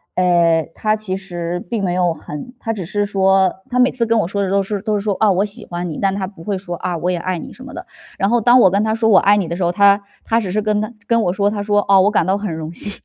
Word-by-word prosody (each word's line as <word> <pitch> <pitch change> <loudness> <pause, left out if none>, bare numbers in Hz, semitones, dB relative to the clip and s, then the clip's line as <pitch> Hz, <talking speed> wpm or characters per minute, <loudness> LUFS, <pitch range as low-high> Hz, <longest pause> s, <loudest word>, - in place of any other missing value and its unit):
呃， 170 -3 +2
他 215 0 0
其 205 -3 -5
实 175 -2 -5
并 220 -4 -2
没 175 -1 0
有 180 -2 +1
很 150 - -9
他 225 -1 -3
只 190 -5 -6
是 205 +3 -1
说 190 -2 +2 0.2
他 250 - -2
每 250 +1 +4
次 235 -2 -1
跟 230 0 +1
我 170 - 0
说 200 +1 -2
的 190 - -1
都 195 0 +1
是 200 0 -3
都 215 -1 -1
是 - - -1
说： 205 -2 0
“啊， 215 -2 +4
我 190 +3 +1
喜 205 - -6
欢 175 0 -5
你。” 155 - -6
但 195 -1 +1
他 195 -1 -2
不 185 -4 -12
会 200 -2 -2
说： 175 -2 -6
“啊， 175 -2 -3
我 180 +3 -1
也 175 - -1
爱 185 +1 -3
你。” - - -9
什 255 - -13
么 265 - -10
的。 - - -8 0.3
然 195 - +1
后 240 -1 +2
当 245 +3 +5
我 190 - +6
跟 200 +2 +1
他 220 0 0
说 225 -1 +1
我 195 - +7
爱 205 +1 +4
你 185 -5 -1
的 170 - -4
时 180 - -2
候， 175 - +1
他 200 +2 +4 0.2
他 225 +1 +1
只 190 -5 -4
是 215 +2 0
跟 210 0 0
他 215 - -4
跟 230 0 +2
我 175 - +1
说， 200 +1 +1
他 205 -1 -3
说： 205 0 +1
“哦， 195 -1 +6
我 205 - +3
感 - - +2
到 190 +1 +1
很 205 -5 -4
荣 160 +1 -6
幸。” 205 +4 -1
200 Hz, 335 characters per minute, -18 LUFS, 180-215 Hz, 0.3 s, 我